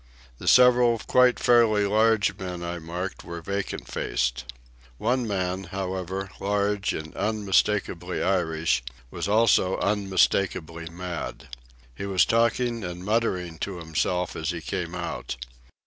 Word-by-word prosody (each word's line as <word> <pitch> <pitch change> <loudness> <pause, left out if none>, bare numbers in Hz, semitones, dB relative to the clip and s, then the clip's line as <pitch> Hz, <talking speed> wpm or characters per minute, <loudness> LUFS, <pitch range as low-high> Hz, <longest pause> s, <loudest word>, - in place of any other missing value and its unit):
The - - -8
several 125 -2 +6
quite 125 +2 +3
fairly 115 -4 +4
large 110 -1 +3
men 90 -3 -6
I 85 0 -4
marked 90 +3 -5
were 85 0 -6
vacant 100 +4 -4
faced. - - -1 0.5
One 120 - 0
man, 95 -1 -2
however, 95 +1 -4
large 100 0 0
and 80 0 -6
unmistakably 100 -3 0
Irish, 80 -8 +1 0.3
was - - -3
also 105 -3 +3
unmistakably 95 -4 0
mad. 90 -4 -6 0.4
He 100 +11 -6
was 95 -3 +4
talking 115 0 +1
and 90 0 -6
muttering 95 -6 -1
to 100 -3 -4
himself 85 +2 -1
as 80 0 -3
he 85 -2 -2
came 80 - -4
out. - - -4
95 Hz, 125 wpm, -26 LUFS, 85-105 Hz, 0.5 s, several